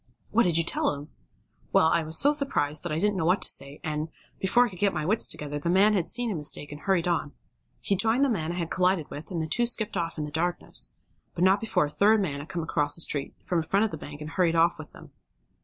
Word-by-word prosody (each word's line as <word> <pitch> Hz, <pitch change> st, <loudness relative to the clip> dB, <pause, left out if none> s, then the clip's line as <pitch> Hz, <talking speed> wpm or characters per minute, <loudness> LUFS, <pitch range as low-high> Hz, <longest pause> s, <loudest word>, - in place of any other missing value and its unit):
'" -, -, -38 dB
"What 235 Hz, +1 st, +3 dB
did 170 Hz, -2 st, +1 dB
you 165 Hz, -, +3 dB
tell 160 Hz, -, 0 dB
him?" 145 Hz, +2 st, -10 dB, 0.6 s
"Well, -, -, +4 dB
I 165 Hz, +1 st, +3 dB
was 160 Hz, 0 st, -3 dB
so 290 Hz, +1 st, +4 dB
surprised 155 Hz, -, -1 dB
that 175 Hz, -, -5 dB
I 150 Hz, -, -1 dB
didn't 205 Hz, +3 st, +1 dB
know 165 Hz, -, -1 dB
what 180 Hz, +4 st, +3 dB
to -, -, +4 dB
say, 140 Hz, +1 st, -2 dB
and, 155 Hz, +1 st, -3 dB, 0.3 s
before 240 Hz, +6 st, +4 dB
I -, -, -4 dB
could 180 Hz, -, -10 dB
get 200 Hz, -1 st, +1 dB
my 155 Hz, -, -2 dB
wits 215 Hz, +6 st, +2 dB
together 145 Hz, 0 st, -3 dB
the 170 Hz, -, -2 dB
man 195 Hz, +4 st, +4 dB
had 180 Hz, -5 st, 0 dB
seen 240 Hz, -2 st, 0 dB
his 190 Hz, -, -3 dB
mistake 150 Hz, -1 st, -1 dB
and 145 Hz, -, -9 dB
hurried 190 Hz, -3 st, +1 dB
on. 160 Hz, -4 st, -1 dB, 0.5 s
He 200 Hz, -, +1 dB
joined 225 Hz, +7 st, +2 dB
the -, -, +4 dB
man 170 Hz, -10 st, -1 dB
I -, -, -4 dB
had 170 Hz, -2 st, -4 dB
collided 180 Hz, -4 st, +1 dB
with, 150 Hz, -, -8 dB
and 175 Hz, -4 st, -3 dB
the 160 Hz, -, -2 dB
two 240 Hz, +10 st, +1 dB
skipped 220 Hz, -3 st, 0 dB
off 170 Hz, -2 st, -2 dB
in 155 Hz, -, -2 dB
the 150 Hz, -, -6 dB
darkness. 175 Hz, +3 st, 0 dB, 0.4 s
But 175 Hz, -, 0 dB
not 190 Hz, +2 st, +4 dB
before 220 Hz, -8 st, +1 dB
a -, -, -5 dB
third 215 Hz, +6 st, +4 dB
man 150 Hz, -8 st, -2 dB
had 145 Hz, -, -9 dB
come 170 Hz, -2 st, -3 dB
across 150 Hz, -2 st, +1 dB
the 170 Hz, -, -2 dB
street, 145 Hz, -3 st, -2 dB
from 175 Hz, -, 0 dB
in -, -, -1 dB
front 195 Hz, +6 st, +2 dB
of 220 Hz, -, -3 dB
the -, -, -4 dB
bank, 145 Hz, +1 st, -9 dB
and 150 Hz, +1 st, -7 dB
hurried 170 Hz, -2 st, +1 dB
off 165 Hz, 0 st, +3 dB
with 155 Hz, -, -9 dB
them." -, -, -14 dB
170 Hz, 280 wpm, -27 LUFS, 155-200 Hz, 0.6 s, Well